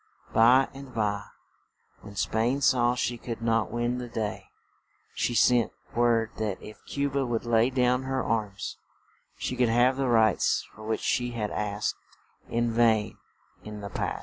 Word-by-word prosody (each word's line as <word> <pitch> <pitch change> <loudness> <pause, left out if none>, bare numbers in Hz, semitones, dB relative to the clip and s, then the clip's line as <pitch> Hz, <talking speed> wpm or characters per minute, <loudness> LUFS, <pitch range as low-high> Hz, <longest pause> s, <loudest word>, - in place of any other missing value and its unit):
By 125 +4 +6
and 135 -2 -11
by, 105 -2 -1 0.8
when 100 -1 -11
Spain 115 +7 0
saw 125 -2 +3
she 120 -1 -2
could 115 -1 -5
not 115 -1 +1
win 120 +1 -1
the 125 - -5
day, 110 -3 -4 0.7
she 120 - -1
sent 120 -1 +4 0.2
word 115 -2 +2
that 105 -3 -2
if 105 - -11
Cu 140 0 0
ba 140 0 -1
would 120 -2 -2
lay 115 +1 +3
down 125 -1 +2
her 130 -1 -1
arms, 105 -4 -2 0.6
she - - -3
could 125 -2 +2
have 125 +3 +3
the 135 -1 0
rights 110 -4 +3
for 110 - -12
which 110 - -1
she 120 0 0
had 105 -3 -3
asked 105 0 -2 0.5
in 120 0 0
vain 115 -2 +2 0.4
in 105 -1 -8
the 100 - -6
past. - - -2
115 Hz, 165 wpm, -27 LUFS, 110-125 Hz, 0.8 s, By